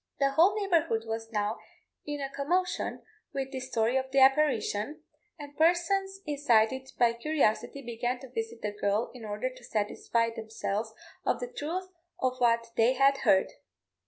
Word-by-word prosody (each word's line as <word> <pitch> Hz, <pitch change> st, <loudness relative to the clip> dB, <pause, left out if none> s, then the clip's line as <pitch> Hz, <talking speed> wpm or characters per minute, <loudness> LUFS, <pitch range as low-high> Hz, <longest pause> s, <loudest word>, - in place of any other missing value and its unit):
The 275 Hz, -1 st, +2 dB
whole 365 Hz, +9 st, +4 dB
neighbourhood 330 Hz, -, +1 dB
was 225 Hz, 0 st, -4 dB
now 210 Hz, 0 st, -1 dB, 0.5 s
in 290 Hz, -1 st, -3 dB
a 275 Hz, -, -3 dB
commotion 355 Hz, +7 st, -1 dB, 0.3 s
with 270 Hz, -1 st, -2 dB
this 260 Hz, -1 st, -5 dB
story 230 Hz, +1 st, +1 dB
of 265 Hz, 0 st, -2 dB
the 270 Hz, -, -2 dB
apparition, 270 Hz, 0 st, +3 dB, 0.3 s
and 290 Hz, -1 st, -10 dB
persons 385 Hz, +4 st, +2 dB
incited 265 Hz, -3 st, +2 dB
by 235 Hz, -1 st, +4 dB
curiosity 275 Hz, 0 st, 0 dB
began 240 Hz, +1 st, -2 dB
to 265 Hz, -3 st, -11 dB
visit 225 Hz, -1 st, -5 dB
the 210 Hz, -, -1 dB
girl 205 Hz, +2 st, -1 dB
in 250 Hz, -3 st, -10 dB
order 215 Hz, +5 st, -3 dB
to -, -, -15 dB
satisfy 230 Hz, +2 st, 0 dB
themselves 220 Hz, -1 st, -3 dB, 0.3 s
of -, -, +1 dB
the -, -, -6 dB
truth 370 Hz, +4 st, -4 dB, 0.3 s
of 255 Hz, 0 st, 0 dB
what 230 Hz, -1 st, +2 dB
they 230 Hz, +3 st, +5 dB
had 275 Hz, +1 st, +4 dB
heard. 190 Hz, 0 st, +3 dB
260 Hz, 160 wpm, -29 LUFS, 225-295 Hz, 0.5 s, they